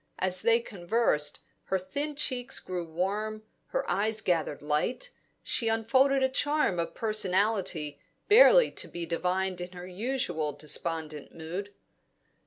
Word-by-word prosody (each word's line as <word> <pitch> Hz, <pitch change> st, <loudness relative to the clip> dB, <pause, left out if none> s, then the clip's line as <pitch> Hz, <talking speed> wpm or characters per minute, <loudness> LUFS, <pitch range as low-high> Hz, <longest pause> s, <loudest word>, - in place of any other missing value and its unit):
As 185 Hz, 0 st, +3 dB
they 230 Hz, 0 st, +4 dB
conversed, 175 Hz, -7 st, 0 dB, 0.2 s
her 190 Hz, -, 0 dB
thin 285 Hz, +12 st, -4 dB
cheeks 255 Hz, -4 st, -1 dB
grew 180 Hz, -2 st, -5 dB
warm, 205 Hz, +6 st, -3 dB, 0.2 s
her -, -, -2 dB
eyes 215 Hz, +4 st, 0 dB
gathered 165 Hz, -7 st, -1 dB
light; 155 Hz, -, -1 dB, 0.3 s
she 230 Hz, -, +1 dB
unfolded 260 Hz, +5 st, +3 dB
a -, -, +5 dB
charm 290 Hz, -, +1 dB
of 165 Hz, -, -3 dB
personality 190 Hz, -8 st, 0 dB, 0.3 s
barely -, -, +7 dB
to -, -, -1 dB
be 170 Hz, -1 st, -5 dB
divined 180 Hz, +2 st, -1 dB
in 180 Hz, +1 st, -7 dB
her 180 Hz, 0 st, -8 dB
usual 180 Hz, -, -2 dB
despondent 155 Hz, -1 st, -3 dB
mood. 175 Hz, +5 st, -6 dB
190 Hz, 130 wpm, -29 LUFS, 170-230 Hz, 0.3 s, barely